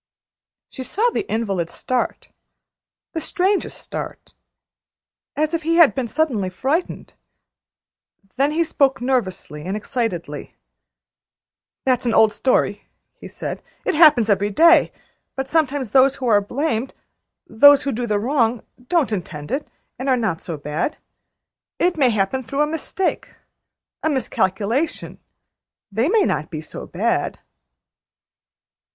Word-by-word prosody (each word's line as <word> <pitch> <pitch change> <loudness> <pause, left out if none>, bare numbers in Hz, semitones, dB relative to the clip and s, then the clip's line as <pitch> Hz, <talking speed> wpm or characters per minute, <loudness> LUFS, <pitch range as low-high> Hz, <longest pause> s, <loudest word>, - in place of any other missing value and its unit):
She 265 - -7
saw 440 - 0
the 400 - -3
invalid 195 -7 -1
start 255 -1 -3 0.8
the 325 - -3
strangest 385 +3 0
start - - -8 1.0
as 305 +2 0
if 335 - 0
he 330 +1 0
had 335 -4 +6
been 260 -3 -2
suddenly 235 -8 0
frightened. 275 - -2 1.2
Then 275 +2 +2
he 320 +3 +1
spoke 275 -4 +1
nervously 225 - -2
and 190 +5 -3
excitedly: 200 - -4 1.3
"That's 255 -2 +1
an 230 - +1
old 220 -1 +5
story," 260 - 0 0.3
he - - -9
said. - - -6 0.2
"It - - +1
happens 300 -8 +6
every 205 -1 +2
day; 335 - +5 0.4
but 270 0 -3
sometimes 285 -6 0
those 270 +2 +5
who 260 - -6
are 210 -4 +4
blamed 255 +2 -2 0.5
those 285 +5 +6
who 280 - -1
do 240 +1 -3
the 210 -2 +1
wrong 235 0 +1 0.2
don't 325 -8 +1
intend 155 -7 -5
it, 285 +2 -2 0.3
and 265 +2 -2
are 255 - +4
not 215 -9 -1
so 165 -3 -5
bad. 150 - -3 0.8
It 355 0 +1
may 275 -5 +3
happen 215 +4 0
through 275 +5 -2
a - - +2
mistake 325 +4 -3 0.7
a 315 - 0
miscalculation; 235 - -1 0.7
they 225 +9 +1
may 430 0 +4
not 155 - -1
be 155 - -5
so 155 - -9
bad." - - -1
255 Hz, 135 wpm, -21 LUFS, 210-300 Hz, 1.3 s, had